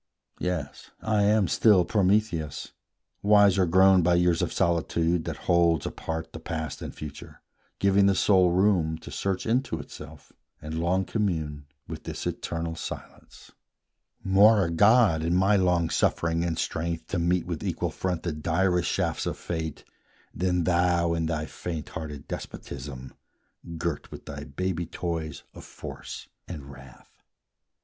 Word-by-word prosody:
Yes, 90 -6 -4
I 110 -2 +2
am 105 -2 +3
still 100 -6 +4
Prometheus, 95 -7 0 0.5
wiser 100 -3 +5
grown 95 +2 +6
By 85 +1 +3
years 85 -1 +2
of - - -1
solitude, 85 0 +1
that - - -6
holds 85 -4 +3
apart 80 0 -5
The - - -7
past 80 -2 -5
and - - -5
future, 75 -2 -10 0.3
giving 100 0 +4
the 100 - +3
soul 95 -2 +4
room 90 -3 +2
To - - -11
search 95 -1 -2
into 120 -6 0
itself, 75 0 -11 0.3
and 80 +1 -5
long 90 +3 +1
commune 80 -9 -2 0.2
With - - -8
this - - -5
eternal 85 0 -3
silence; - - -9 0.7
more 100 +1 +5
a 85 - -2
god, 100 -2 +5
In 85 +2 0
my 95 +3 +4
long 90 -3 +2
suffering 85 0 +1
and 85 -2 -1
strength 85 0 -2
to 90 - -1
meet 85 +1 +1
With 85 -3 -4
equal - - -2
front 90 -3 -3
the 85 - -1
direst 85 +3 +1
shafts - - -1
of - - -3
fate, 80 -3 -5 0.5
Than 90 0 0
thou 85 -1 +2
in 80 -1 -1
thy 80 -1 -2
faint 80 -1 -6
hearted 75 -3 -7
despotism, 65 -1 -7 0.6
Girt 80 -2 -3
with - - -10
thy - - -7
baby 85 +3 -3
toys 80 -3 -4
of - - -11
force - - -9 0.2
and 70 -5 -8
wrath. 65 -2 -16
85 Hz, 145 wpm, -27 LUFS, 80-95 Hz, 0.7 s, grown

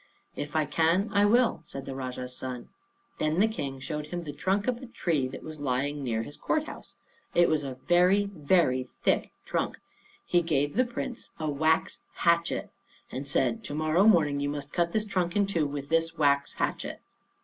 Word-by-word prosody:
"If 150 +1 -5
I 155 -1 +3
can, 165 +7 +2
I 200 0 +5
will," 235 -5 +3
said 135 -3 -8
the 135 - -5
Rajah's 125 -1 -5
son. 125 -2 -6 0.5
Then 155 +3 +1
the 215 - +5
King 140 -12 -4
showed 150 +3 -4
him 175 +2 -4
the 150 -3 -6
trunk 195 +7 0
of 250 -2 +1
a 260 +1 -9
tree 160 - 0
that 130 - -8
was 155 -1 -8
lying 140 +1 -1
near 115 -3 -1
his 145 - -9
court 310 - 0
house. - - -10 0.4
It 175 - +6
was 155 -2 +1
a 135 -2 -5
very, 180 +4 +4
very 150 -8 +1
thick - - +2 0.2
trunk. - - -1 0.5
He 175 - +3
gave 145 -3 0
the 255 +4 +3
Prince 245 0 -5
a 155 -1 -1
wax 155 +3 +1 0.2
hatchet, 170 0 +1 0.4
and 135 +2 -5
said, 225 +10 +1
"To 145 - -5
morrow 155 +5 +3
morning 155 -9 +5
you 145 0 -1
must 145 0 -5
cut 170 -1 +1
this 215 +2 +1
trunk 180 -4 -1
in 205 -1 +4
two 170 -6 0
with 140 0 -5
this 165 +1 +1
wax 140 -2 +2
hatchet." - - -2
155 Hz, 195 wpm, -28 LUFS, 140-185 Hz, 0.5 s, It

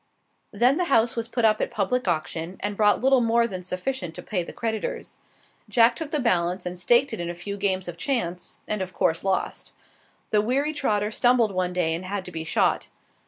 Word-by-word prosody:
Then 255 +4 +3
the 360 - +1
house 235 -6 +3
was 230 -1 -2
put 235 -1 0
up 215 -1 +3
at - - 0
public 230 +3 -1
auction, 165 +1 -2
and 205 +1 -2
brought 210 0 +3
little 265 0 +4
more 235 0 +3
than 185 -5 -5
sufficient 180 0 -4
to - - -7
pay 190 -5 -1
the 170 - -7
creditors. 220 -2 -4 0.5
Jack 235 0 +5
took 320 +1 -5
the 300 - -1
balance 180 -6 0
and 180 0 -4
staked 240 +8 +3
it 225 - -3
in 170 0 -3
a 175 - -4
few 200 +4 -5
games 190 -2 0
of 175 -1 -6
chance, 180 -5 -2
and 210 -2 -1
of 185 0 -5
course 165 - +1
lost. 190 -1 -2 0.6
The 210 - +4
weary 275 +7 0
trotter 210 -8 0
stumbled 240 -1 +3
one 185 -1 -1
day 175 -3 +1
and 170 +3 -3
had 190 0 -4
to 180 - -8
be 160 -2 -4
shot. 160 - +1
205 Hz, 215 wpm, -25 LUFS, 180-235 Hz, 0.6 s, Jack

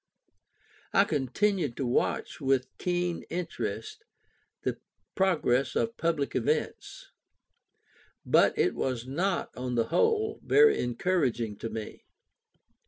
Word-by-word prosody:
I 195 - +6
continued 155 - 0
to 135 - -1
watch 120 +4 -1
with 135 -2 0
keen 175 -1 -1
interest 120 - -4 0.6
the - - -2 0.3
progress 150 -9 +1
of 230 +1 0
public 165 -7 -1
events. 125 -3 -2 1.1
But - - +4
it - - +2
was 125 -3 -2
not, 175 +8 -1
on 125 -1 -3
the 115 -1 +1
whole, 435 -1 +1
very 440 0 +5
encouraging 120 - 0
to 115 - -5
me. 110 -1 -7
140 Hz, 105 wpm, -29 LUFS, 120-185 Hz, 1.1 s, I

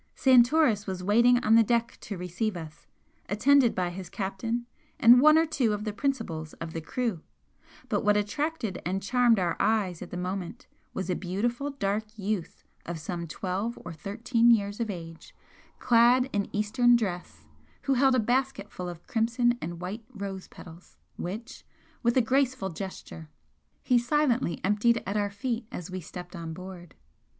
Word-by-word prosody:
Santoris 250 -4 +4
was 185 -1 -4
waiting 235 +5 +5
on 215 - +4
the 230 - +8
deck 235 +1 0
to 200 - -6
receive 180 +3 -3
us, 155 -2 -10 0.4
attended 245 +4 +4
by 180 -1 -1
his 180 -1 -8
captain 220 +6 -3 0.3
and 240 +2 +8
one 305 +2 +7
or 325 - +4
two 255 -8 0
of 210 0 -3
the 210 -1 -3
principals 210 - -3
of 165 -1 -7
the 165 - -4
crew, 220 0 -2 0.7
but - - -1
what 210 0 +4
attracted 225 - -2
and 190 +2 -2
charmed 245 +1 +3
our 175 -3 0
eyes 200 -5 +1
at - - -7
the 180 - -6
moment 180 0 -5 0.3
was 190 - -4
a - - 0
beautiful 235 +9 -2
dark 215 -5 -2
youth 200 -3 -3 0.2
of 170 0 -5
some 170 +2 -5
twelve 195 +7 -3
or 170 - -6
thirteen 230 - +1
years 205 -2 +2
of 230 -2 -2
age, 165 -4 -8 0.4
clad 245 +1 +4
in 200 -1 -1
Eastern 240 +4 +3
dress, 190 -7 -3 0.4
who 275 - +1
held 265 0 +4
a - - +3
basket 245 -2 -1
full 180 -1 -5
of 175 -1 -10
crimson 240 +1 +1
and 170 +1 -6
white 200 +6 -5
rose 195 -4 -6
petals, 170 0 -14 0.2
which, 225 +8 -6 0.4
with 235 0 +2
a - - +6
graceful 255 -3 +1
gesture, 170 -3 -8 0.5
he 250 -2 +4
silently 250 - +1
emptied 210 +4 +2
at 200 - -3
our 205 -1 +1
feet 225 +3 -3
as 175 +1 -7
we 185 0 -4
stepped 175 +2 -9
on 165 -2 -6
board. 180 -1 -10
210 Hz, 170 wpm, -28 LUFS, 180-240 Hz, 0.7 s, the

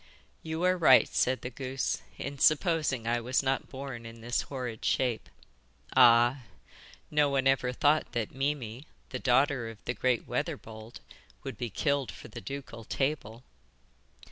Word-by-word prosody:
'You 160 +1 -4
are 185 0 +3
right,' 130 -6 +7
said 130 +1 +1
the 125 - -5
goose, 130 +1 -3 0.2
'in 140 0 -6
supposing 155 - +2
I 120 +1 0
was 125 +3 0
not 135 0 -1
born 130 -3 -7
in 115 0 -10
this 120 +2 0
horrid 125 -5 -6
shape. 125 -4 0 0.7
Ah! 120 +1 +6 0.7
no 150 -1 +3
one 135 -1 +1
ever 135 -2 +2
thought 150 +4 +2
that 115 -3 -2
Mimi, 135 -1 -3 0.2
the 125 - -4
daughter 130 -1 +2
of 115 - -10
the 120 - -1
great 125 -2 0
Weatherbold, 110 +1 -5 0.4
would 135 -3 -5
be 120 +2 -4
killed 140 0 0
for - - -12
the - - -8
ducal 135 -5 -7
table. 130 -3 -2
130 Hz, 150 wpm, -29 LUFS, 120-140 Hz, 0.7 s, right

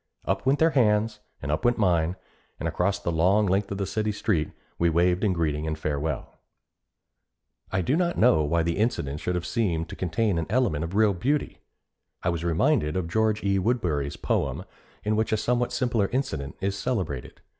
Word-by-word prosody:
Up - - -1
went 135 +2 +4
their 160 +2 +4
hands 105 -4 +2 0.2
and 70 - -2
up 75 - -1
went 120 0 +3
mine, 90 -4 +2 0.4
and 80 - -2
across 90 +4 0
the 85 - -3
long 95 +6 +3
length 100 +1 +1
of 100 -1 -2
city 110 +1 -1
street, 100 -7 0 0.3
we 85 - +3
waved 90 +3 +2
in 105 - +3
greeting 80 -3 -1
and 80 0 -2
farewell. 75 -2 -3 1.3
I 95 - +1
do 130 - +1
not 175 0 0
know 110 -9 +5
why 80 +3 +1
the 85 0 -1
incident 95 - -1
should 90 - -2
have 90 0 -2
seemed 85 -9 -1
to - - -7
contain 95 +1 0
an 80 - -3
element 105 - +1
of 85 +4 -5
real 105 -1 +4
beauty. 140 +11 -1 0.6
I - - +1
was 85 -1 -2
reminded 85 - +2
of 90 -3 -1
George 110 +1 +1
E. 100 -1 +2
Woodberry's 90 - 0
poem - - -1 0.4
in 105 +1 +1
which 110 +1 0
a 110 - +3
somewhat 120 +2 0
similar 120 -6 +1
incident 80 - -3
is 100 0 -1
celebrated. 95 - -3
95 Hz, 190 wpm, -26 LUFS, 80-110 Hz, 1.3 s, know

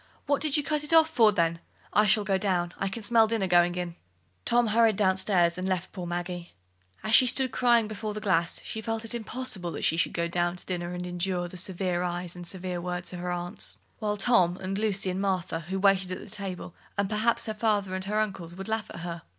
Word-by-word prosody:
"What 285 -1 +1
did 305 -1 +3
you 295 - 0
cut 300 0 -1
it 300 - -3
off 320 -1 +6
for, 225 -8 +5
then? 170 -3 +1 0.3
I 210 0 +4
shall 210 +1 +4
go 195 -1 +1
down: 180 -4 0
I 195 - 0
can 215 +3 -5
smell 225 +1 +4
the 230 - -1
dinner 205 -4 0
going 175 -1 +4
in." 175 -1 -3 0.5
Tom 240 0 +4
hurried 225 0 +4
down 190 -2 +3
stairs 180 -3 +2
and 185 +1 -2
left 185 -1 -2
poor 180 -3 -6
Maggie. 175 0 -4 0.5
As 215 - -1
she 255 - +8
stood 260 +1 +2
crying 235 -2 +3
before 215 0 -5
the - - -3
glass, 175 -5 +1
she 220 - -4
felt 225 0 -3
it 225 - +2
impossible 225 -5 -4
that - - -5
she 165 - +2
should 170 - +1
go 170 0 0
down 175 0 0
to 180 - -7
dinner 175 -1 -3
and 180 0 -4
endure 180 0 -2
the 175 - -11
severe 180 -1 -1
eyes 175 0 -3
and 175 -1 -7
severe 180 -1 -4
words 180 0 -4
of 180 - -6
her 180 0 -3
aunts, 175 0 -2 0.2
while 210 -2 -1
Tom, 195 -5 +3
and 195 +1 -3
Lucy, 195 -3 +1
and 185 +1 -3
Martha, 185 -4 -1
who 190 - -1
waited 190 -1 +3
at 190 +2 -8
table, 190 -4 -3 0.2
and 200 0 +1
perhaps 220 +3 +1
her 220 - -2
father 210 -3 0
and 190 0 -3
her 210 +2 0
uncles, 190 -5 -3
would 195 +2 -7
laugh 220 -1 -2
at 170 - -8
her. 170 -1 -5
190 Hz, 240 wpm, -28 LUFS, 175-215 Hz, 0.5 s, she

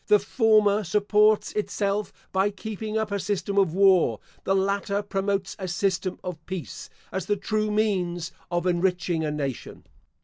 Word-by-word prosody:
The 210 - +6
former 215 0 +3
supports 210 +3 +3
itself 205 0 -1 0.2
by 190 +2 +2
keeping 215 +2 -5
up 220 -1 -1
a 200 - 0
system 200 0 -1
of 185 -4 +2
war; 185 - +4 0.3
the 195 - +2
latter 200 +1 0
promotes 195 -1 -2
a 190 - -4
system 185 +1 -1
of 175 -3 -6
peace, 185 -3 -6 0.2
as 190 -2 -3
the 205 - +1
true 215 +2 -1
means 185 -6 0 0.2
of 175 0 -1
enriching 180 -2 +1
a 155 - 0
nation. 140 -4 -4
195 Hz, 150 wpm, -25 LUFS, 180-210 Hz, 0.3 s, The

